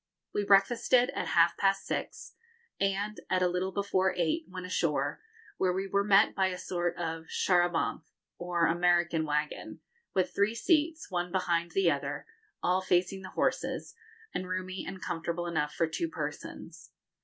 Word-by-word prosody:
We 205 - 0
breakfasted 230 +5 +4
at - - -3
half 170 0 +4
past 195 0 +2
six, - - -4 0.5
and, 200 +2 -1
at 185 -1 +2
a - - +4
little 180 +2 -1
before 190 -1 +1
eight, 165 -2 0
went 185 -1 -6
ashore, 150 -5 -1 0.4
where 185 -1 +2
we 190 +1 -1
were 200 +1 +1
met 200 +1 +5
by 190 -1 +2
a 185 -1 -3
sort 175 -2 -2
of 165 -1 -4
char 175 -1 +3
à - - -12
bancs, 165 -1 -2 0.3
or 175 -1 +1
American 175 -1 +2
wagon, 150 0 -2 0.4
with 185 -1 +1
three 205 +3 +2
seats, 315 - +1
one 175 -1 -1
behind 170 -2 0
the 390 - +4
other, - - -3 0.4
all 185 +1 +2
facing 185 +1 +1
the 185 - -8
horses, - - -1 0.4
and 185 0 -3
roomy 185 0 -3
and 190 0 -7
comfortable 170 +1 -3
enough 150 -3 -1
for 165 - +1
two 165 - -2
persons. - - -7
185 Hz, 165 wpm, -30 LUFS, 170-195 Hz, 0.5 s, met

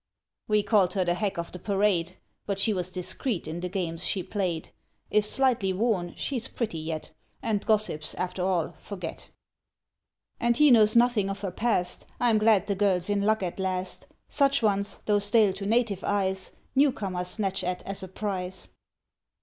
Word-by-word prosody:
"We 210 -1 +3
called 195 -5 +3
her 185 -2 +1
the 175 - +2
Hack 195 +1 -2
of 170 0 -4
the 180 - -8
Parade; 195 -3 +1 0.3
But 200 -1 -2
she 215 +2 +3
was 180 -2 -2
discreet 185 - -2
in 160 +2 -4
the 180 +1 -3
games 175 -2 -3
she 185 0 0
played; 180 -6 -3 0.4
If 210 0 +4
slightly 230 -5 +2
worn, 190 -4 0
she's 250 -5 -2
pretty 215 -9 -3
yet, 155 0 -5 0.3
And 210 -3 0
gossips, 210 -9 0
after 180 0 -3
all, 175 -3 0
forget. 180 -5 -7 1.1
"And 235 0 +2
he 300 -1 +6
knows 215 -2 +6
nothing 235 -4 +4
of 195 0 -4
her 195 -3 -3
past; 185 -3 0
I 240 -1 +3
am 215 - +3
glad 215 -3 +4
the 205 - 0
girl's 195 -1 +1
in 200 -1 +1
luck 215 0 +2
at 180 +1 -4
last; 185 -1 -2 0.2
Such 280 -2 +2
ones, 200 -1 +1
though 205 -1 +3
stale 205 -1 +3
to 195 +1 -5
native 220 -4 +1
eyes, 190 -2 0 0.2
Newcomers 200 -10 +1
snatch 195 0 -1
at 180 0 -2
as 195 0 -3
a 190 - -5
prize." 190 -1 -4
195 Hz, 175 wpm, -27 LUFS, 180-215 Hz, 1.1 s, he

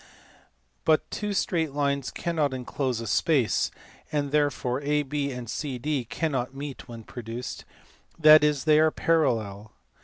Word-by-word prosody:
But 155 -1 +2
two 210 0 -3
straight 165 -6 0
lines 140 -2 0
cannot 155 -5 -1
enclose 125 -1 -2
a - - -5
space, 120 - +2 0.4
therefore 145 -3 0
AB 145 -1 -1
and 125 -2 -6
CD 135 +1 -3
cannot 135 -1 -2
meet 140 -2 -7
when 115 -2 -9
produced, 120 +2 -7 0.5
that 155 -1 +8
is, 150 -3 +2
they 155 -1 +5
are 160 0 +5
parallel. 110 -12 0
140 Hz, 125 wpm, -26 LUFS, 125-155 Hz, 0.5 s, that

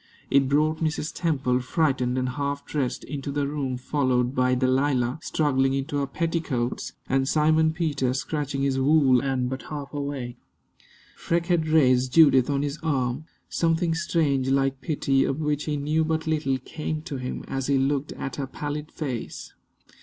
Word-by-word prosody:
It 135 -1 +4
brought 155 +2 +2
Mrs. 160 0 -2
Temple, 135 -7 0
frightened 130 -2 0
and 130 0 0
half 140 +1 -3
dressed, 135 -5 -2
into 140 0 -5
the 140 0 -1
room, 140 -3 -2
followed 125 -2 0
by 125 -1 +2
Delilah, 130 0 +1
struggling 135 -5 +1
into 140 +2 -2
her 140 -1 0
petticoats, 160 -6 -2
and 135 0 +1
Simon 155 +1 +3
Peter, 150 -6 0
scratching 140 0 -2
his 135 -1 +1
wool 135 -3 +4
and 130 -2 0
but 130 +1 -4
half 145 -2 -6
awake. 140 -4 -4 0.8
Freke 170 0 -1
had 160 -2 +1
raised 130 -5 +3
Judith 140 -6 +6
on 140 0 +1
his 145 +2 -3
arm. 135 -2 -1 0.2
Something 165 0 +1
strange, 145 -5 +1
like 135 0 +1
pity, 140 -3 +1
of 135 - -1
which 150 -1 -1
he 150 -1 -1
knew 150 +3 +1
but 160 0 -1
little, 155 -4 0
came 155 +4 -5
to 155 -5 -5
him 125 0 -5
as 135 -1 -3
he 140 -1 +3
looked 140 +2 0
at 135 -2 -6
her 140 -2 -3
pallid 150 +2 -5
face. 130 -7 -5
140 Hz, 165 wpm, -25 LUFS, 130-155 Hz, 0.8 s, Judith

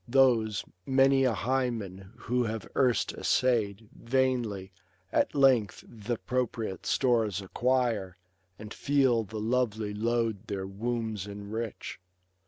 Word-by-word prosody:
Those, 120 -5 +3 0.2
many 135 +2 +4
a 125 - +3
Hymen 110 -5 -2
who 125 0 0
have 110 -2 -4
erst 125 -3 +2
essay'd, 110 -4 +1
Vainly, 120 -6 0 0.4
at - - +1
length 130 -7 +3
th* 110 -1 -13
appropriate 120 -5 -2
stores 115 -7 +2
acquire. 115 -2 0 0.4
And 105 0 -8
feel 135 -5 +2
the 110 +1 -6
lovely 110 -2 0
load 115 -1 -1
their 95 -2 -3
wombs 110 0 -3
enrich. 105 +2 -6
115 Hz, 110 wpm, -29 LUFS, 105-125 Hz, 0.4 s, many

